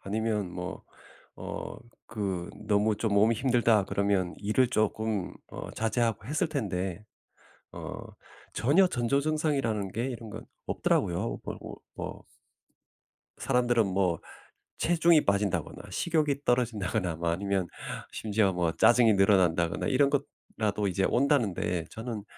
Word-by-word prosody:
아니면 105 Hz, -2 st, -1 dB
뭐 90 Hz, +1 st, -6 dB, 0.5 s
어 -, -, -6 dB, 0.3 s
그 95 Hz, -5 st, -3 dB, 0.2 s
너무 105 Hz, 0 st, +2 dB
좀 110 Hz, -3 st, 0 dB
몸이 110 Hz, +3 st, +4 dB
힘들다 115 Hz, -4 st, +3 dB
그러면 100 Hz, -3 st, 0 dB
일을 110 Hz, +5 st, +2 dB
쪼끔 110 Hz, -3 st, 0 dB, 0.2 s
어 -, -, -7 dB
자제하고 115 Hz, -2 st, -1 dB
했을 150 Hz, +7 st, 0 dB
텐데 95 Hz, -, -3 dB, 0.7 s
어 -, -, -7 dB, 0.6 s
전혀 145 Hz, -, +4 dB
전조증상이라는 140 Hz, -, 0 dB
게 115 Hz, +5 st, -2 dB
이런 120 Hz, -4 st, -6 dB
건 110 Hz, +1 st, -8 dB, 0.2 s
없더라고요. 90 Hz, +7 st, 0 dB
그러고 -, -, -8 dB
뭐 -, -, -6 dB, 1.1 s
사람들은 120 Hz, -3 st, +2 dB
뭐 90 Hz, -3 st, +1 dB, 0.6 s
체중이 170 Hz, -2 st, +4 dB
빠진다거나 100 Hz, -5 st, 0 dB
식욕이 155 Hz, -4 st, +1 dB
떨어진다거나 110 Hz, -7 st, 0 dB
뭐 85 Hz, +1 st, -2 dB
아니면 95 Hz, +1 st, -1 dB, 0.4 s
심지어 105 Hz, -2 st, +1 dB
뭐 85 Hz, -2 st, 0 dB
짜증이 120 Hz, +3 st, +5 dB
늘어난다거나 90 Hz, -4 st, +3 dB
이런 140 Hz, +1 st, +3 dB, 0.5 s
거라도 105 Hz, -2 st, 0 dB
이제 95 Hz, +1 st, 0 dB
온다는데 110 Hz, -, +1 dB
저는 110 Hz, -2 st, -6 dB
110 Hz, 280 characters per minute, -29 LUFS, 95-120 Hz, 1.1 s, 짜증이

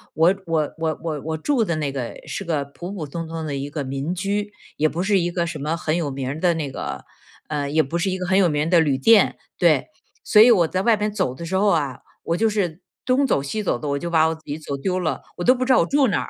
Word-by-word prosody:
我 165 Hz, +5 st, +4 dB
我 155 Hz, -3 st, 0 dB
我 160 Hz, -1 st, -1 dB
我 155 Hz, -4 st, -3 dB
我 160 Hz, +1 st, -3 dB
住 245 Hz, -, +1 dB
的 170 Hz, -6 st, -1 dB
那 150 Hz, -3 st, -2 dB
个 130 Hz, -4 st, -5 dB
是 -, -, -4 dB
个 155 Hz, -6 st, -1 dB
普 170 Hz, +6 st, -8 dB
普 185 Hz, -6 st, -5 dB
通 165 Hz, +3 st, -6 dB
通 165 Hz, 0 st, -5 dB
的 145 Hz, -2 st, -3 dB
一 140 Hz, +1 st, -4 dB
个 145 Hz, 0 st, -4 dB
民 135 Hz, +6 st, -3 dB
居， 205 Hz, +3 st, -2 dB, 0.3 s
也 155 Hz, +1 st, +2 dB
不 170 Hz, +4 st, -3 dB
是 200 Hz, 0 st, +3 dB
一 175 Hz, 0 st, 0 dB
个 175 Hz, 0 st, -1 dB
什 165 Hz, -, -5 dB
么 155 Hz, +4 st, -2 dB
很 160 Hz, -2 st, -1 dB
有 165 Hz, -4 st, -1 dB
名 135 Hz, -1 st, -4 dB
儿 145 Hz, +3 st, -4 dB
的 175 Hz, 0 st, +2 dB
那 150 Hz, -4 st, -3 dB
个， -, -, -6 dB, 0.4 s
嗯， 145 Hz, -2 st, -2 dB
也 155 Hz, +1 st, +3 dB
不 165 Hz, +6 st, -3 dB
是 190 Hz, +3 st, 0 dB
一 185 Hz, -, -1 dB
个 185 Hz, -, -4 dB
很 190 Hz, +2 st, +3 dB
有 185 Hz, -3 st, +4 dB
名 150 Hz, -1 st, 0 dB
儿 -, -, -2 dB
的 175 Hz, -, +6 dB
旅 145 Hz, -4 st, +2 dB
店 220 Hz, +11 st, +5 dB, 0.2 s
对。 -, -, +3 dB, 0.3 s
所 210 Hz, -, +6 dB
以 235 Hz, -, +8 dB
我 180 Hz, -8 st, +5 dB
在 185 Hz, -, -1 dB
外 225 Hz, +1 st, +3 dB
面 210 Hz, 0 st, -2 dB
走 130 Hz, -11 st, -1 dB
的 170 Hz, -, -7 dB
时 185 Hz, +3 st, -3 dB
候 205 Hz, +2 st, +3 dB
啊， 145 Hz, -8 st, +1 dB, 0.2 s
我 165 Hz, -, 0 dB
就 225 Hz, +2 st, +2 dB
是 185 Hz, -5 st, -2 dB, 0.2 s
东 260 Hz, +2 st, +3 dB
走 140 Hz, -, +1 dB
西 175 Hz, +10 st, -3 dB
走 195 Hz, -, 0 dB
的， 150 Hz, -, -6 dB
我 140 Hz, 0 st, -1 dB
就 170 Hz, -, -4 dB
把 160 Hz, -2 st, +4 dB
我 160 Hz, -, 0 dB
自 160 Hz, -, -12 dB
己 145 Hz, +1 st, -4 dB
走 150 Hz, -3 st, -5 dB
丢 185 Hz, +6 st, -1 dB
了， 155 Hz, -6 st, -2 dB, 0.2 s
我 175 Hz, -, -3 dB
都 255 Hz, -, +6 dB
不 255 Hz, 0 st, -2 dB
知 260 Hz, -, +1 dB
道 -, -, +6 dB
我 -, -, +3 dB
住 280 Hz, -1 st, +3 dB
哪 205 Hz, -, 0 dB
儿。 -, -, -9 dB
165 Hz, 315 characters per minute, -22 LUFS, 150-190 Hz, 0.4 s, 以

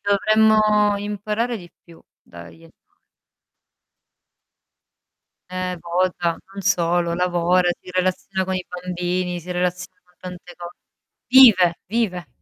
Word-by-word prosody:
dovremmo 215 Hz, 0 st, +3 dB
imparare 210 Hz, +3 st, -3 dB
di 175 Hz, -4 st, -12 dB
più 170 Hz, -1 st, -18 dB, 0.2 s
dagli 85 Hz, -1 st, -14 dB
anima -, -, -19 dB, 2.8 s
Eh, 185 Hz, -1 st, -4 dB
vota? 175 Hz, -1 st, -1 dB, 0.2 s
Non 195 Hz, -, -7 dB
solo: 175 Hz, -3 st, +1 dB
lavora, 180 Hz, 0 st, +1 dB
si -, -, -12 dB
relaziona 185 Hz, +1 st, -1 dB
con 190 Hz, -, -3 dB
i 185 Hz, -1 st, -3 dB
bambini, 180 Hz, 0 st, -3 dB
si 175 Hz, +2 st, -11 dB
relaziona 180 Hz, 0 st, -3 dB
con 180 Hz, 0 st, -31 dB
tante 180 Hz, -1 st, -10 dB
co 175 Hz, 0 st, -8 dB, 0.6 s
Vive! 215 Hz, -10 st, +6 dB
vive! 190 Hz, -5 st, -2 dB
180 Hz, 110 wpm, -21 LUFS, 175-200 Hz, 2.8 s, Vive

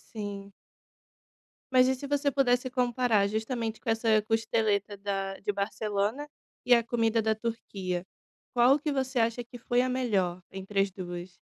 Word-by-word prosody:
Sim. 200 Hz, -2 st, -6 dB, 1.2 s
Mas 255 Hz, 0 st, +6 dB
e 265 Hz, -, +2 dB
se 280 Hz, +2 st, -7 dB
você 285 Hz, 0 st, +1 dB
pudesse 255 Hz, -2 st, +2 dB
comparar, 245 Hz, -4 st, +2 dB
justamente 220 Hz, +1 st, -3 dB
com -, -, -5 dB
essa 225 Hz, -1 st, +3 dB
costeleta 215 Hz, -2 st, 0 dB
da 195 Hz, -1 st, -3 dB
de 205 Hz, -, -1 dB
Barcelona 205 Hz, +5 st, -2 dB, 0.4 s
e 250 Hz, -, +6 dB
a 235 Hz, -1 st, +5 dB
comida 230 Hz, -1 st, +1 dB
da 220 Hz, 0 st, +1 dB
Turquia. 195 Hz, -6 st, -4 dB, 0.5 s
Qual 250 Hz, +4 st, +5 dB
que 300 Hz, +1 st, -2 dB
você 265 Hz, -2 st, -1 dB
acha 230 Hz, +1 st, +1 dB
que 240 Hz, +1 st, -11 dB
foi 245 Hz, +1 st, +1 dB
a 255 Hz, -, 0 dB
melhor 200 Hz, -9 st, 0 dB
entre 195 Hz, +1 st, -3 dB
as 195 Hz, 0 st, +2 dB
2? 180 Hz, -1 st, -7 dB
225 Hz, 155 wpm, -29 LUFS, 200-245 Hz, 1.2 s, Mas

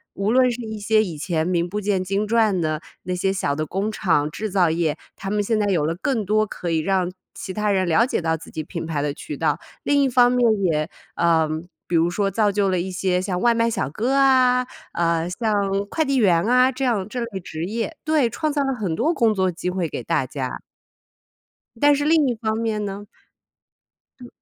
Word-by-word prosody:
无 200 Hz, +2 st, 0 dB
论 255 Hz, 0 st, +4 dB
是 240 Hz, +1 st, -5 dB
一 220 Hz, -1 st, -5 dB
些 215 Hz, +1 st, +3 dB
以 170 Hz, -7 st, -6 dB
前 160 Hz, +1 st, -1 dB
名 175 Hz, -1 st, 0 dB
不 205 Hz, +4 st, -3 dB
见 200 Hz, -2 st, 0 dB
经 195 Hz, +3 st, -1 dB
传 215 Hz, -4 st, +2 dB
的 155 Hz, -2 st, -1 dB, 0.2 s
那 180 Hz, 0 st, -3 dB
些 190 Hz, +2 st, 0 dB
小 185 Hz, -7 st, -1 dB
的 155 Hz, +1 st, -2 dB
工 195 Hz, +6 st, -2 dB
厂， 165 Hz, -9 st, +1 dB
制 215 Hz, +7 st, -4 dB
造 185 Hz, -3 st, +3 dB
业， 160 Hz, -2 st, 0 dB, 0.2 s
他 195 Hz, -, -6 dB
们 210 Hz, +1 st, +1 dB
现 220 Hz, +2 st, 0 dB
在 210 Hz, -1 st, +1 dB
有 175 Hz, -7 st, +1 dB
了 165 Hz, +2 st, -1 dB
更 245 Hz, -7 st, 0 dB
多 215 Hz, +2 st, +2 dB
可 180 Hz, -4 st, -6 dB
以 160 Hz, -, +2 dB
让 185 Hz, +1 st, 0 dB, 0.2 s
其 190 Hz, -, -7 dB
他 210 Hz, +1 st, 0 dB
人 190 Hz, -2 st, +1 dB
了 170 Hz, +8 st, +4 dB
解 255 Hz, -, -1 dB
到 160 Hz, -1 st, 0 dB
自 160 Hz, -, -11 dB
己 155 Hz, -, -4 dB
品 165 Hz, +2 st, -6 dB
牌 155 Hz, -3 st, -2 dB
的 145 Hz, 0 st, -1 dB
渠 145 Hz, -, -7 dB
道。 160 Hz, -, +1 dB, 0.3 s
另 285 Hz, 0 st, +3 dB
一 270 Hz, -, +2 dB
方 245 Hz, -1 st, +5 dB
面 250 Hz, 0 st, +2 dB, 0.2 s
也 155 Hz, -4 st, +1 dB, 0.3 s
呃， 165 Hz, -2 st, +3 dB, 0.4 s
比 175 Hz, -, -1 dB
如 165 Hz, +1 st, +3 dB
说 195 Hz, +3 st, 0 dB
造 205 Hz, +1 st, +2 dB
就 200 Hz, 0 st, +1 dB
了 185 Hz, -, +1 dB
一 190 Hz, +2 st, -4 dB
些 180 Hz, 0 st, 0 dB
像 185 Hz, -1 st, -2 dB
外 235 Hz, +4 st, +4 dB
卖 230 Hz, 0 st, +2 dB
小 135 Hz, -, -2 dB
哥 235 Hz, -, -1 dB
啊， 255 Hz, -2 st, +4 dB, 0.3 s
呃， 170 Hz, 0 st, 0 dB
像 220 Hz, +4 st, -1 dB, 0.4 s
快 320 Hz, -, 0 dB
递 275 Hz, -2 st, 0 dB
员 180 Hz, -8 st, +4 dB
啊 250 Hz, +4 st, +4 dB
这 265 Hz, +1 st, -4 dB
样 220 Hz, -7 st, 0 dB
这 245 Hz, +3 st, -4 dB
类 230 Hz, -5 st, -4 dB
职 160 Hz, -2 st, -6 dB
业。 225 Hz, -, -3 dB
对， 305 Hz, -6 st, +2 dB
创 305 Hz, +7 st, -2 dB
造 290 Hz, 0 st, 0 dB
了 270 Hz, 0 st, 0 dB
很 200 Hz, -8 st, -2 dB
多 295 Hz, -, +1 dB
工 230 Hz, -8 st, +2 dB
作 190 Hz, -2 st, +1 dB
机 180 Hz, +1 st, -3 dB
会 180 Hz, -2 st, -1 dB
给 -, -, -6 dB
大 165 Hz, -5 st, 0 dB
家。 130 Hz, 0 st, -5 dB, 1.2 s
但 290 Hz, 0 st, +6 dB
是 285 Hz, +1 st, -1 dB
另 310 Hz, -1 st, +4 dB
一 245 Hz, -, 0 dB
方 220 Hz, -1 st, -2 dB
面 220 Hz, -2 st, -1 dB
呢？ 205 Hz, +1 st, -6 dB, 1.1 s
嗯。 245 Hz, -, -10 dB
200 Hz, 245 characters per minute, -22 LUFS, 170-235 Hz, 1.2 s, 但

